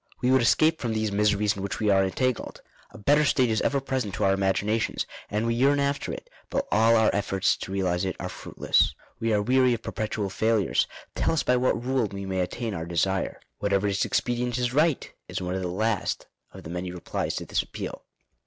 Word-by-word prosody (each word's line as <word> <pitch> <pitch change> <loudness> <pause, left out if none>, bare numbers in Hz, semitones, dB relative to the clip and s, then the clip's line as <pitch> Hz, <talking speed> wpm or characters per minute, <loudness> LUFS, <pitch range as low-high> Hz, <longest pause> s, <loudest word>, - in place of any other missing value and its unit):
"We 125 0 +2
would 130 -1 +5
escape 155 +8 +3
from 115 -3 -1
these 110 -1 0
miseries 105 0 +2
in 100 - -6
which 100 - -3
we 105 -2 +2
are 95 0 +4
entangled. 125 +6 -2 0.3
A - - -13
better 145 +8 +3
state 130 -4 +3
is 110 - +1
ever 140 - +1
present 130 -7 -2
to - - -2
our 95 - +4
imaginations, 100 +3 0 0.2
and 105 +2 -1
we 115 - +1
yearn 140 +4 +3
after 140 0 -1
it; - - -7 0.2
but - - -1
all 115 +2 +5
our 110 -1 +4
efforts 95 -1 +1
to - - -7
realize 90 -2 0
it 95 -2 -2
are - - -3
fruitless. - - +1 0.2
We 115 0 0
are 105 -1 +2
weary 130 +1 +4
of 115 - -10
perpetual 105 -2 -3
failures; 110 -3 +2 0.3
tell - - +1
us 160 - +1
by 125 - +3
what 125 -1 +1
rule 130 -3 +1
we 100 -1 -6
may 95 -1 -2
attain 110 +5 -2
our 80 -3 -4
desire." 95 +3 0 0.2
"Whatever 100 -1 +1
is 100 -1 +1
expedient 120 0 0
is 125 -1 -1
right;" 155 0 +1
is - - -4
one 90 -1 -3
of 95 - -2
the 90 - -2
last 105 +3 -1 0.3
of - - -11
the 80 - -8
many 90 +1 -4
replies 90 -1 -3
to - - -4
this - - 0
appeal. - - -7
110 Hz, 220 wpm, -26 LUFS, 95-125 Hz, 0.3 s, would